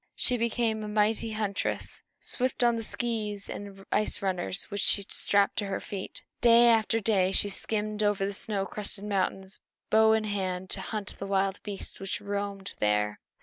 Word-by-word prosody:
She 250 Hz, -, +3 dB
became 230 Hz, -1 st, 0 dB
a -, -, -4 dB
mighty 215 Hz, +1 st, +1 dB
huntress, 210 Hz, -2 st, -2 dB, 0.2 s
swift 255 Hz, -1 st, 0 dB
on 240 Hz, -1 st, +4 dB
the 230 Hz, -, -2 dB
skees 215 Hz, -3 st, -3 dB
and 195 Hz, -1 st, -8 dB
ice 215 Hz, -, +1 dB
runners 185 Hz, -1 st, 0 dB
which 200 Hz, -1 st, -2 dB
she 200 Hz, -, +3 dB
strapped 200 Hz, 0 st, +2 dB
to 205 Hz, -, -2 dB
her 195 Hz, -, -2 dB
feet. 195 Hz, -2 st, -7 dB, 0.2 s
Day 235 Hz, 0 st, +7 dB
after 225 Hz, 0 st, +3 dB
day 195 Hz, -4 st, +2 dB
she 205 Hz, +1 st, +2 dB
skimmed 210 Hz, +1 st, -2 dB
over 205 Hz, -2 st, +2 dB
the 200 Hz, -, -2 dB
snow 195 Hz, 0 st, -2 dB
crusted 205 Hz, 0 st, -4 dB
mountains, 195 Hz, -1 st, 0 dB, 0.3 s
bow 220 Hz, 0 st, +6 dB
in 220 Hz, 0 st, +2 dB
hand, 190 Hz, -3 st, -2 dB
to -, -, -1 dB
hunt 210 Hz, -3 st, -4 dB
the 195 Hz, -, -4 dB
wild 195 Hz, 0 st, 0 dB
beasts 205 Hz, -2 st, -5 dB
which 195 Hz, -, -3 dB
roamed 200 Hz, -1 st, -3 dB
there. 105 Hz, 0 st, +2 dB
205 Hz, 175 wpm, -29 LUFS, 195-220 Hz, 0.3 s, Day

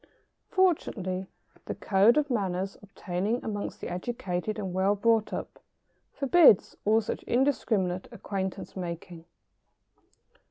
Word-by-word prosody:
Fortunately, 195 Hz, -, 0 dB, 0.4 s
the -, -, -4 dB
code 205 Hz, +6 st, +4 dB
of 290 Hz, -2 st, +1 dB
manners 195 Hz, -4 st, -1 dB
obtaining 200 Hz, +3 st, -3 dB
amongst 205 Hz, -2 st, -4 dB
the -, -, -4 dB
educated 180 Hz, 0 st, -3 dB
and 190 Hz, -4 st, -4 dB
well 190 Hz, +2 st, +2 dB
brought 225 Hz, +1 st, +2 dB
up -, -, -6 dB, 0.5 s
forbids 280 Hz, -, +5 dB
all 220 Hz, +2 st, +4 dB
such -, -, -4 dB
indiscriminate 220 Hz, -8 st, +1 dB
acquaintance 190 Hz, -2 st, -5 dB
making. 170 Hz, -2 st, -6 dB
200 Hz, 110 wpm, -28 LUFS, 185-230 Hz, 0.5 s, forbids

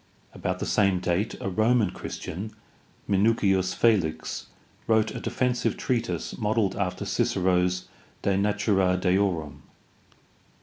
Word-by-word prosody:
About -, -, -2 dB
the -, -, -3 dB
same 100 Hz, -3 st, +2 dB
date 90 Hz, +3 st, -1 dB
a -, -, -4 dB
Roman 110 Hz, +1 st, +2 dB
Christian, 100 Hz, +6 st, -6 dB, 0.5 s
Minucius 95 Hz, -2 st, +2 dB
Felix, 85 Hz, -9 st, +1 dB, 0.4 s
wrote 110 Hz, -1 st, +3 dB
a -, -, -5 dB
defensive 125 Hz, -1 st, 0 dB
treatise 120 Hz, -2 st, -2 dB
modeled 105 Hz, -3 st, +1 dB
after 90 Hz, -3 st, -2 dB
Cicero's 90 Hz, -1 st, +1 dB, 0.4 s
De 100 Hz, -, +2 dB
natura 100 Hz, -2 st, +2 dB
deorum. 90 Hz, -5 st, 0 dB
100 Hz, 105 wpm, -26 LUFS, 90-110 Hz, 0.5 s, wrote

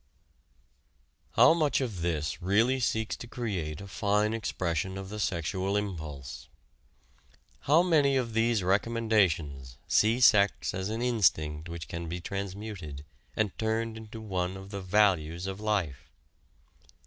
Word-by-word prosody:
How -, -, +7 dB
much 155 Hz, -4 st, +2 dB
of 115 Hz, -10 st, -3 dB
this 80 Hz, -1 st, -2 dB
really 110 Hz, +8 st, +2 dB
seeks 110 Hz, -3 st, 0 dB
to 120 Hz, -, -9 dB
create 95 Hz, -12 st, -4 dB
a 100 Hz, -, -8 dB
fine 105 Hz, +2 st, +1 dB
expression 95 Hz, -4 st, -2 dB
of 95 Hz, 0 st, -7 dB
the 105 Hz, +1 st, -6 dB
sexual 95 Hz, +2 st, -1 dB
impulse? 80 Hz, -10 st, -5 dB, 1.2 s
How 160 Hz, +4 st, +6 dB
many 145 Hz, -6 st, +3 dB
of 120 Hz, -3 st, -2 dB
these 115 Hz, -2 st, +2 dB
recommendations 95 Hz, -, +1 dB
see 110 Hz, +3 st, +3 dB
sex 105 Hz, -5 st, +4 dB
as 95 Hz, +2 st, -3 dB
an 115 Hz, +2 st, -2 dB
instinct 85 Hz, -9 st, +1 dB
which 85 Hz, -1 st, -6 dB
can 85 Hz, -1 st, -5 dB
be 90 Hz, +2 st, -4 dB
transmuted, 95 Hz, -6 st, -6 dB, 0.3 s
and 105 Hz, -3 st, 0 dB
turned 110 Hz, 0 st, -1 dB
into 110 Hz, 0 st, -9 dB
one 95 Hz, -3 st, -2 dB
of 95 Hz, +1 st, -11 dB
the 100 Hz, -1 st, -5 dB
values 90 Hz, -4 st, +2 dB
of 95 Hz, +1 st, -4 dB
life? 100 Hz, -10 st, -2 dB
100 Hz, 135 wpm, -29 LUFS, 85-110 Hz, 1.2 s, How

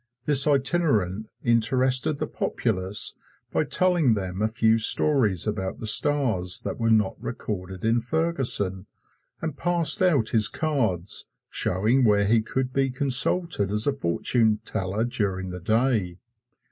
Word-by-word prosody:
This 145 Hz, -1 st, +4 dB
itinerant 135 Hz, -, 0 dB, 0.2 s
interested 130 Hz, +4 st, +1 dB
the 155 Hz, -, -3 dB
populace 105 Hz, -7 st, -1 dB, 0.4 s
by -, -, 0 dB
telling 175 Hz, -10 st, +2 dB
them 95 Hz, -1 st, -5 dB
a 110 Hz, -, +2 dB
few 110 Hz, 0 st, +1 dB
stories 110 Hz, -, +3 dB
about 95 Hz, -3 st, -4 dB
the -, -, -7 dB
stars 110 Hz, -7 st, +2 dB
that -, -, -5 dB
were 115 Hz, 0 st, 0 dB
not 110 Hz, -3 st, +1 dB
recorded 95 Hz, -2 st, -6 dB
in 115 Hz, +1 st, +1 dB
Ferguson, 125 Hz, -, -1 dB, 0.6 s
and 160 Hz, -3 st, -4 dB
passed 175 Hz, +3 st, +2 dB
out 150 Hz, -12 st, +2 dB
his 110 Hz, -2 st, +2 dB
cards 115 Hz, -, -1 dB, 0.2 s
showing 110 Hz, +8 st, +1 dB
where 105 Hz, -3 st, +3 dB
he 110 Hz, +2 st, +2 dB
could 130 Hz, +3 st, -4 dB
be 135 Hz, 0 st, 0 dB
consulted 130 Hz, -, +1 dB
as 105 Hz, +1 st, 0 dB
a 145 Hz, -, +1 dB
fortune 110 Hz, 0 st, 0 dB
teller 95 Hz, +4 st, -3 dB
during 95 Hz, -6 st, -3 dB
the 90 Hz, -, -7 dB
day. 110 Hz, -2 st, 0 dB
115 Hz, 135 wpm, -24 LUFS, 100-135 Hz, 0.6 s, This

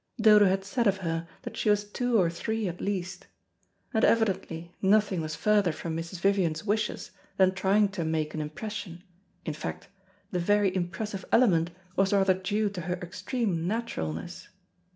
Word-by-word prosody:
Dodo 210 Hz, -2 st, +7 dB
had 190 Hz, +1 st, 0 dB
said 235 Hz, +3 st, 0 dB
of 195 Hz, -1 st, +3 dB
her 165 Hz, 0 st, -2 dB, 0.2 s
that -, -, -7 dB
she -, -, 0 dB
was 205 Hz, 0 st, +3 dB
two 235 Hz, +2 st, 0 dB
or 180 Hz, -, +4 dB
three 220 Hz, +5 st, -2 dB
at 175 Hz, 0 st, -5 dB
least. 190 Hz, -2 st, -3 dB, 0.7 s
And 220 Hz, -, +2 dB
evidently 190 Hz, -6 st, +1 dB
nothing 200 Hz, -2 st, +3 dB
was 155 Hz, -1 st, -4 dB
further 205 Hz, +1 st, +3 dB
from 160 Hz, +1 st, -5 dB
Mrs. 165 Hz, +2 st, -5 dB
Vivian's 185 Hz, -5 st, +1 dB
wishes 215 Hz, +1 st, -1 dB, 0.3 s
than 185 Hz, -1 st, +4 dB
trying 195 Hz, +3 st, +3 dB
to 195 Hz, -4 st, -3 dB
make 160 Hz, -1 st, -1 dB
an 155 Hz, -, -3 dB
impression, 175 Hz, +3 st, -6 dB, 0.4 s
in 155 Hz, -, -2 dB
fact, 155 Hz, +5 st, -6 dB, 0.4 s
the 180 Hz, -, 0 dB
very 200 Hz, +1 st, +2 dB
impressive 190 Hz, +3 st, -3 dB
element 175 Hz, -9 st, +4 dB, 0.3 s
was 195 Hz, +1 st, +2 dB
rather 195 Hz, -1 st, +4 dB
due 205 Hz, +3 st, -1 dB
to 185 Hz, -3 st, -5 dB
her 180 Hz, +1 st, -2 dB
extreme 180 Hz, 0 st, -2 dB
naturalness. 175 Hz, -, -4 dB
190 Hz, 165 wpm, -28 LUFS, 170-210 Hz, 0.7 s, Dodo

